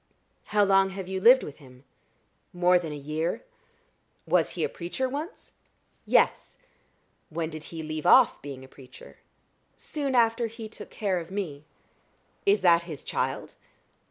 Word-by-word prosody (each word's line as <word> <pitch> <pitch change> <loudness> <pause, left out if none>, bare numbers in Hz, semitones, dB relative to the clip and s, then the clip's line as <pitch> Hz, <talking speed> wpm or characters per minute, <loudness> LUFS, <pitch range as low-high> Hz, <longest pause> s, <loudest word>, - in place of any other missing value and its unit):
"How 210 -1 +2
long 195 -1 +4
have 190 -2 -5
you 190 0 -3
lived 250 +5 +7
with 145 - -8
him?" 130 -3 -17 0.7
"More 180 0 +4
than 165 -3 -6
a - - -5
year." 155 - -3 0.8
"Was - - +2
he - - 0
a - - +2
preacher 180 - -3
once?" 295 - -6 0.6
"Yes." - - +2 0.7
"When 165 0 -3
did 155 0 -8
he 165 -1 -7
leave 155 0 -4
off - - +6
being 135 -2 -8
a - - -15
preacher?" 130 -1 -15 0.6
"Soon 280 -4 -3
after 230 0 +3
he 225 0 -8
took 220 - -11
care 195 -5 -1
of 165 0 -9
me." 165 -7 -5 0.8
"Is 200 +1 +4
that 170 -2 +5
his 150 -4 -7
child?" - - -3
180 Hz, 155 wpm, -27 LUFS, 155-220 Hz, 0.8 s, lived